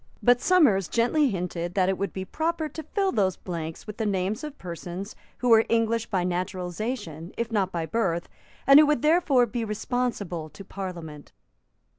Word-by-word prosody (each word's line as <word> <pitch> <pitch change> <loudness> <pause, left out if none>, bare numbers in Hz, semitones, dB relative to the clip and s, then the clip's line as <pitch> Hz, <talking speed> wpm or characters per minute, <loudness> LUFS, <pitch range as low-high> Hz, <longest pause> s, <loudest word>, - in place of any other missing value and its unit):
But 245 0 +5
Somers 275 - +4
gently 265 +5 +2
hinted 175 -3 -3
that 185 -2 +3
it 190 - +2
would 200 +1 -3
be 190 0 -5
proper 320 - -1
to 315 - -7
fill 385 +5 -1
those 190 - +1
blanks 165 -3 -6
with 210 -1 -8
the 220 - -1
names 195 +3 -1
of 300 -1 -7
persons 180 +3 -7 0.2
who 250 - 0
were 225 -1 +7
English 230 0 +1
by 185 -3 0
naturalisation, 180 - -4
if 235 0 -2
not 195 -4 +1
by 170 -2 -2
birth, 175 -4 -1 0.4
and 275 +2 +9
who 305 - +6
would 295 -5 +1
therefore 305 -6 +4
be 235 +1 -3
responsible 210 -7 -2
to 195 - -12
Parliament. 170 -7 -7
205 Hz, 175 wpm, -26 LUFS, 180-245 Hz, 0.4 s, and